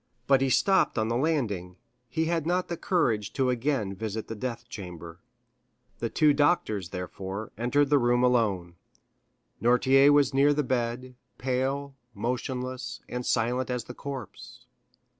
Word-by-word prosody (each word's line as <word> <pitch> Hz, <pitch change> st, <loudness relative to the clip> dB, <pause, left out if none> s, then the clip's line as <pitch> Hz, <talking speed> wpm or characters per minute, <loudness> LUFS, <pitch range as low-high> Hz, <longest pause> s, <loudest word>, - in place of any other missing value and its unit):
But 135 Hz, -1 st, +4 dB
he 135 Hz, -, +2 dB
stopped 195 Hz, +6 st, +3 dB
on 110 Hz, 0 st, +1 dB
the 115 Hz, -, 0 dB
landing; 115 Hz, -, -1 dB, 0.3 s
he 160 Hz, +6 st, 0 dB
had 165 Hz, -1 st, -1 dB
not 180 Hz, +1 st, 0 dB
the 170 Hz, -, -2 dB
courage 115 Hz, -, 0 dB
to 130 Hz, -2 st, +1 dB
again 125 Hz, -5 st, -1 dB
visit 110 Hz, +2 st, -5 dB
the 115 Hz, -, -5 dB
death 120 Hz, +1 st, -5 dB
chamber. 85 Hz, -5 st, -9 dB, 0.8 s
The 115 Hz, -, -2 dB
two 150 Hz, +3 st, +4 dB
doctors, 140 Hz, -, +1 dB
therefore, 95 Hz, +3 st, -6 dB
entered 135 Hz, +5 st, +1 dB
the 145 Hz, -, +6 dB
room 120 Hz, 0 st, +2 dB
alone. 100 Hz, -9 st, +1 dB, 0.8 s
Noirtier 130 Hz, +4 st, +5 dB
was 145 Hz, -1 st, +4 dB
near 145 Hz, +2 st, +4 dB
the 150 Hz, -, +1 dB
bed, 125 Hz, 0 st, -2 dB, 0.2 s
pale, 135 Hz, +2 st, -1 dB, 0.2 s
motionless, 125 Hz, +2 st, -3 dB
and 125 Hz, 0 st, -4 dB
silent 125 Hz, +3 st, 0 dB
as 125 Hz, -2 st, -2 dB
the 125 Hz, -, -9 dB
corpse. 135 Hz, -5 st, -8 dB
125 Hz, 145 wpm, -27 LUFS, 110-140 Hz, 0.8 s, the